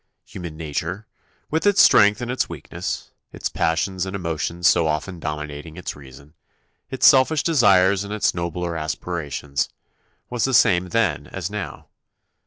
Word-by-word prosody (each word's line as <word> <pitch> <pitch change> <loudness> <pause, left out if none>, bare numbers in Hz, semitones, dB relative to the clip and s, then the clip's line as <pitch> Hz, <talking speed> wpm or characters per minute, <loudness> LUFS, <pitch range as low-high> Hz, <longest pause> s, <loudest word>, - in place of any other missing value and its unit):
Human 85 -4 -8
nature, 80 +6 -4 0.5
with 160 +6 +1
its 205 -1 +3
strength 105 +3 +6
and 120 0 -3
its 130 - -1
weakness, - - -6 0.2
its - - -4
passions 90 +3 -1
and 95 +1 -4
emotions 85 -1 -1
so 85 -2 +4
often 80 +4 -3
dominating 75 +1 -6
its 90 - -5
reason, 70 +1 -14 0.6
its 130 - 0
selfish 145 +2 +5
desires 100 - +4
and 100 - -8
its 105 -1 +1
nobler 85 0 -3
aspirations, 75 -3 -3 0.6
was 120 -2 -2
the 135 -1 +1
same 90 -6 +4
then 105 -10 0
as - - -5
now. - - -6
90 Hz, 145 wpm, -22 LUFS, 80-105 Hz, 0.6 s, strength